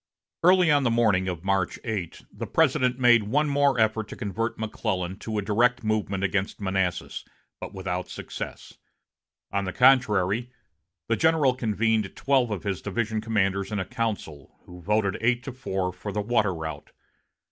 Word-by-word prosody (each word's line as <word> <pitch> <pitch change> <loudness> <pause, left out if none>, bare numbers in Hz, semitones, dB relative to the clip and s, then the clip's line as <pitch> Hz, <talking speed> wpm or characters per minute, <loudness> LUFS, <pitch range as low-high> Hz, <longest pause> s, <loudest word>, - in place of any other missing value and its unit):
Early 180 -1 +5
on 145 -1 +4
the 130 - +2
morning 110 -5 +2
of 90 -2 -4
March 95 -2 0
8, 105 -7 -4
the - - -6
President 130 -5 +2
made 120 -4 +5
one 150 +5 +2
more 140 -3 +2
effort 110 -1 +1
to - - -8
convert 115 +1 -3
McClellan 95 -4 -3
to 110 -1 -4
a 105 - -1
direct 120 +4 +2
movement 105 -3 -1
against 100 0 -1
Manassas, 95 -3 -2 0.4
but - - -7
without 90 -1 -3
success. - - -8 0.7
On 100 0 -1
the 95 - -3
contrary, 120 -4 +3 0.6
the 115 - +2
general 160 -2 +3
convened 110 -3 0
twelve 130 -3 +2
of 105 -4 -4
his 100 -3 -2
division 110 +1 -2
commanders 100 -3 0
in 105 - -1
a 95 - -2
council, 100 - -4
who 90 0 -12
voted 100 +1 0
eight 120 +1 +1
to 135 - -5
four 95 -8 -3
for 105 - -6
the 105 - -2
water 105 -4 +1
route. 80 -1 -6
110 Hz, 165 wpm, -26 LUFS, 95-120 Hz, 0.7 s, Early